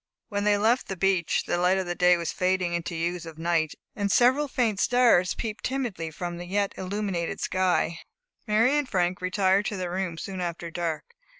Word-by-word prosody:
When 205 0 -2
they 205 0 +4
left 225 +5 +2
the 195 - -5
beach, 185 -2 +1
the 175 - -1
light 180 +2 +3
of 175 -2 -2
day 180 0 +5
was 170 -1 -3
fading 185 -1 0
into 170 0 -3
the 165 - -3
hues 175 0 -2
of 160 -1 -10
night; 165 -2 0 0.2
and 200 -1 -1
several 260 +7 +4
faint 235 -7 0
stars 240 -8 +4
peeped 215 -2 -5
timidly 240 -11 -2
from 175 +2 -5
the 175 - -7
yet 200 +2 0
illuminated 190 -3 -3
sky. 180 -3 0 0.5
Mary 225 +6 +3
and 280 -3 -3
Frank 180 -1 0
retired 190 +2 +2
to 205 - -3
their 180 -2 -3
room 180 -2 -3
soon 190 +2 -5
after 170 -1 -4
dark. 165 -2 -3
185 Hz, 195 wpm, -26 LUFS, 175-210 Hz, 0.5 s, day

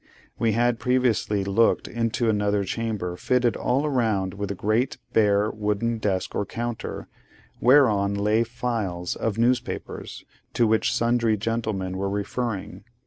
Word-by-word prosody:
We 115 -2 +2
had 120 +1 +1
previously 125 -5 +1
looked 100 +4 +2
into 115 0 -1
another 105 -2 +1
chamber 105 -4 -3
fitted 125 +4 +1
all 135 +5 0
round 110 -9 0
with 100 -1 -4
a 100 - -3
great, 110 +7 0 0.2
bare, 105 -1 +3
wooden 110 +2 -1
desk 95 -3 -1
or - - 0
counter, 120 +3 -5 0.5
whereon 110 -7 +4
lay 105 +2 +2
files 110 -7 -3
of 110 -2 -2
newspapers, 120 +1 -2 0.3
to 120 - +4
which 110 0 +2
sundry 115 -2 +2
gentlemen 105 -4 -2
were 100 0 -1
referring. 100 +1 -3
110 Hz, 135 wpm, -25 LUFS, 100-120 Hz, 0.5 s, whereon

